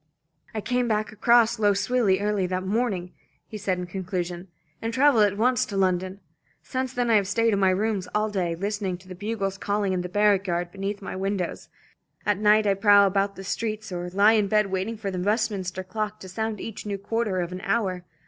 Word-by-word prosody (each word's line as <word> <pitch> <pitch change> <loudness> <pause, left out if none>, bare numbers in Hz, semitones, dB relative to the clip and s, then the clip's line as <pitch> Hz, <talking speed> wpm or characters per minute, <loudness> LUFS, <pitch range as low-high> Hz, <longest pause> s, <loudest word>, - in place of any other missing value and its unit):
"I 215 - -1
came 250 +2 0
back 215 0 0
across 235 +1 +3
Lough 205 -2 +3
Swilly 205 -2 +2
early 205 -2 0
that 185 0 -2
morning," 195 -4 -1 0.3
he - - -10
said 190 -2 -1
in 180 - -4
conclusion, 180 -1 -4 0.3
"and 225 - -2
travelled 255 -3 +5
at 200 -1 -1
once 250 +3 +3
to 200 - -4
London. 185 +1 0 0.4
Since 260 -1 -3
then 245 -1 0
I 220 - +6
have 200 -2 0
stayed 230 +2 +2
in 200 - +1
my 190 -1 +4
rooms 195 0 0
all 215 0 +2
day, 180 -5 -1
listening 200 0 -2
to 185 +1 -19
the 185 - -7
bugles 195 0 -3
calling 200 -1 0
in 180 - 0
the 180 - -5
barrack 205 0 +3
yard 175 0 -1
beneath 200 +1 -4
my - - -5
windows. 190 -2 -3 0.6
At 210 -2 +1
night 210 0 +4
I 200 - +4
prowl 200 0 +6
about 195 +1 0
the 195 - -8
streets 215 +1 -3
or 175 0 -4
lie 200 +4 +5
in 210 -2 +2
bed 210 -1 +2
waiting 195 +4 -2
for 200 -2 -4
the 185 - -3
Westminster 200 -2 -1
clock 215 +3 -4
to 190 - -8
sound 220 +2 -3
each 225 +1 -6
new 205 -1 -3
quarter 205 -1 -1
of 175 0 -2
an 180 +1 -6
hour. 195 -3 -1
200 Hz, 215 wpm, -25 LUFS, 185-215 Hz, 0.6 s, I